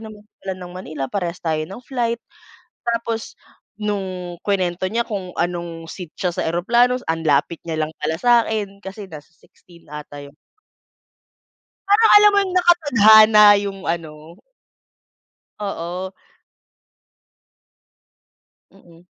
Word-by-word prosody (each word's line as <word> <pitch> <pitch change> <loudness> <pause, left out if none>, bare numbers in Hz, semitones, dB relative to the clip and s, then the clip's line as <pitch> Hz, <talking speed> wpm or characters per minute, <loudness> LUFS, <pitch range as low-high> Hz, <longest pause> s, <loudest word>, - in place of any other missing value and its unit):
na 220 - -9 0.3
pala 190 -1 -5
ng 180 -1 -10
Manila, 155 -7 -6
parehas 175 -4 -2
tayo 160 -1 0
ng 195 +6 -9
flight." 235 -3 -2 0.7
Tapos 230 -1 -3 0.4
nung 185 -4 -4
kinuwento 185 -2 -1
niya 230 +4 -1
kung 190 -5 -6
anong 170 -1 -3
seat 180 -5 -10
siya 180 -2 -2
sa 165 - -3
eroplano, 235 +9 +2 0.2
ang 165 -1 -4
lapit 150 +3 +1
niya 160 - -2
lang 155 - -5
pala 160 +1 -1
sa'kin, 220 -2 +1
kasi 195 0 -10
nasa 155 +2 -12
16 170 +2 -22
ata 145 -1 -9
yun. 140 +1 -14 1.5
Parang 440 +2 +5
alam 415 0 +7
mo 405 - +2
yung 370 - -5
nakatadhana 220 - +6 0.2
yung 195 -1 -5
ano 165 -2 -3 1.5
Oo. 185 -2 -5 2.6
Mm. 175 -3 -20
185 Hz, 120 wpm, -20 LUFS, 170-220 Hz, 2.6 s, alam